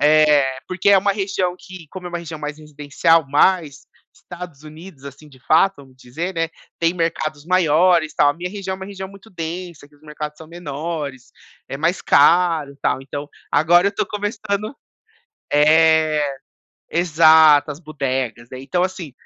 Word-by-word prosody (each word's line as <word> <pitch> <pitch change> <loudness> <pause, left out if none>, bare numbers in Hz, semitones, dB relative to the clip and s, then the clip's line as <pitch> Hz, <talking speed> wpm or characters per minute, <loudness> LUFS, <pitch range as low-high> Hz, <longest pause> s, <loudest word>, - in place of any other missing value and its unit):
É, 150 -3 +4
porque 185 +2 -1
é 200 - +7
uma 200 +1 +1
região 190 -3 -2
que 185 -3 -12
como 185 -2 -8
é - - -4
uma 175 0 -4
região 160 -2 -8
mais 150 0 -6
residencial, 150 +2 +1
mais 150 0 +1 0.3
Estados 175 -5 -11
Unidos, 155 -1 -13
assim, 140 +2 -11
de 130 -2 -19
fato, 190 +8 +3
vamos 135 -2 -17
dizer, 160 +10 -6
né, 165 0 -1 0.3
tem 165 0 +1
mercados 155 -3 -3
maiores, 170 -2 +3
tal. 145 - +4
A - - +2
minha 180 +2 -6
região 195 -1 -5
é - - -8
uma 190 0 -8
região 190 -1 -7
muito 200 +3 -16
densa, 170 -3 -7
que 150 - -26
os 145 - -30
mercados 150 0 -7
são 160 - -12
menores, 150 -4 -6 0.4
é - - -5
mais 165 +4 0
caro, 160 -2 +3
tal. - - 0
Então, 145 +2 -7 0.2
agora 175 +5 +4
eu - - +2
estou 200 - -2
começando 205 +2 -4 0.8
é, 155 -1 +3 0.6
exato, 160 -3 +5
as 145 - -7
budegas, 130 -6 -4
né. 130 - -8
Então 140 +7 -1
assim, 180 -5 -4
160 Hz, 170 wpm, -20 LUFS, 145-180 Hz, 0.8 s, é